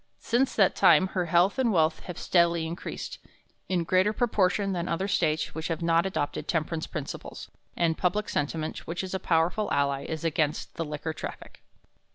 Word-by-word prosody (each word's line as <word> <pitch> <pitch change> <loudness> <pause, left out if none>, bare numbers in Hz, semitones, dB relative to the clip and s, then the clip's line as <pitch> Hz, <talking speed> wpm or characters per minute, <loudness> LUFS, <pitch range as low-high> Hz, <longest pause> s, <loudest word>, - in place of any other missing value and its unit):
Since 255 +3 0
that 195 -4 +4
time 190 - +5
her 180 -3 -1
health 175 +7 +3
and 245 -3 +3
wealth 160 -3 +2
have 180 - -7
steadily 170 -2 +2
increased, 170 +2 -6 0.5
in 180 -2 +1
greater 185 +4 +3
proportion 200 -3 +1
than 175 -1 -2
other 185 +4 -1
States 160 -5 0
which 160 0 -4
have 165 0 -3
not 165 +2 +3
adopted 145 -6 -3
temperance 160 -1 -1
principles; 150 -4 -7 0.3
and 165 -2 +2
public 195 +5 0
sentiment, 155 +2 -3
which 170 +3 -3
is 185 - -5
a 190 - -1
powerful 175 +6 +1
ally, 140 -1 +1
is 160 +1 -4
against 155 -2 -1
the 165 - -3
liquor 150 +1 -4
traffic. - - -8
170 Hz, 175 wpm, -27 LUFS, 160-190 Hz, 0.5 s, time